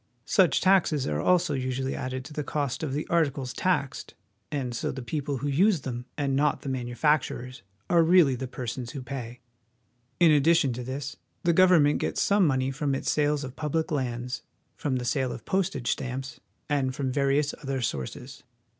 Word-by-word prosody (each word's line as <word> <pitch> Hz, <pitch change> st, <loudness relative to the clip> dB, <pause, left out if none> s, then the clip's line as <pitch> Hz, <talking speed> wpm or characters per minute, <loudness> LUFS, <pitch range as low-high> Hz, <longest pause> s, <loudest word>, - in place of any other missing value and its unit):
Such 185 Hz, -4 st, +3 dB
taxes 185 Hz, -7 st, +3 dB
are 75 Hz, +1 st, -1 dB
also 175 Hz, -3 st, +3 dB
usually 130 Hz, 0 st, -2 dB
added 130 Hz, 0 st, -4 dB
to 150 Hz, -, -10 dB
the 150 Hz, -, -3 dB
cost 145 Hz, -3 st, -2 dB
of 155 Hz, -4 st, -2 dB
the 150 Hz, +2 st, -2 dB
articles 140 Hz, -6 st, 0 dB
taxed, 175 Hz, -6 st, -1 dB, 0.4 s
and 130 Hz, -4 st, -2 dB
so -, -, -2 dB
the 130 Hz, -, -6 dB
people 145 Hz, +2 st, -3 dB
who 145 Hz, -, -3 dB
use 175 Hz, +4 st, +3 dB
them, 125 Hz, -2 st, -5 dB
and 140 Hz, -2 st, 0 dB
not 145 Hz, +1 st, +1 dB
the 140 Hz, -, -4 dB
manufacturers, 125 Hz, 0 st, -1 dB, 0.3 s
are 170 Hz, -1 st, +4 dB
really 165 Hz, -4 st, +5 dB
the 130 Hz, +1 st, -4 dB
persons 120 Hz, -1 st, -5 dB
who 135 Hz, -, -6 dB
pay. 125 Hz, -2 st, -7 dB, 0.8 s
In 170 Hz, -2 st, +6 dB
addition 150 Hz, -2 st, +4 dB
to 125 Hz, +1 st, -5 dB
this, 135 Hz, +2 st, -5 dB, 0.3 s
the 170 Hz, -, +3 dB
government 165 Hz, -5 st, +5 dB
gets -, -, -2 dB
some 200 Hz, -3 st, +4 dB
money 130 Hz, -1 st, +1 dB
from 140 Hz, 0 st, -1 dB
its -, -, -1 dB
sales 150 Hz, -1 st, +1 dB
of 130 Hz, -1 st, -7 dB
public 160 Hz, +2 st, -2 dB
lands, 125 Hz, -2 st, -2 dB, 0.3 s
from 140 Hz, -3 st, -2 dB
the 125 Hz, -1 st, -2 dB
sale 130 Hz, -1 st, 0 dB
of 115 Hz, -, -8 dB
postage 175 Hz, -11 st, 0 dB
stamps, 130 Hz, +1 st, -4 dB, 0.3 s
and 135 Hz, -3 st, 0 dB
from 135 Hz, -2 st, -2 dB
various 140 Hz, +2 st, +1 dB
other 135 Hz, -2 st, -2 dB
sources. 125 Hz, -, -4 dB
140 Hz, 180 wpm, -27 LUFS, 130-150 Hz, 0.8 s, In